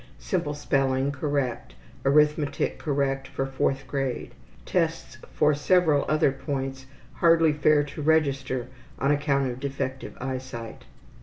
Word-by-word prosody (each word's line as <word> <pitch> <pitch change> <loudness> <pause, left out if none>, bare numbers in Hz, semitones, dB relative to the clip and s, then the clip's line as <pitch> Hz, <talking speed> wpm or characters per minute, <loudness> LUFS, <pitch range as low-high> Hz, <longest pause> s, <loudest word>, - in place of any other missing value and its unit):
Simple 160 -6 -2
spelling 135 -1 +1
correct. 135 - -2 0.3
Arithmetic 150 +1 +2
correct 135 -2 -1
for 135 - -3
4th 135 0 -1
grade. 135 -1 -3 0.3
Tests - - -1
for 150 0 +3
several 150 -1 +3
other 155 -2 +3
points 135 -1 -4 0.3
hardly 165 -2 +4
fair 150 0 +3
to 145 +1 -7
register 140 -5 +1 0.3
on 140 +2 +1
account 140 -2 +1
of 120 - -7
defective 135 -1 -4
eyesight. 130 -3 -6
140 Hz, 120 wpm, -26 LUFS, 135-150 Hz, 0.3 s, hardly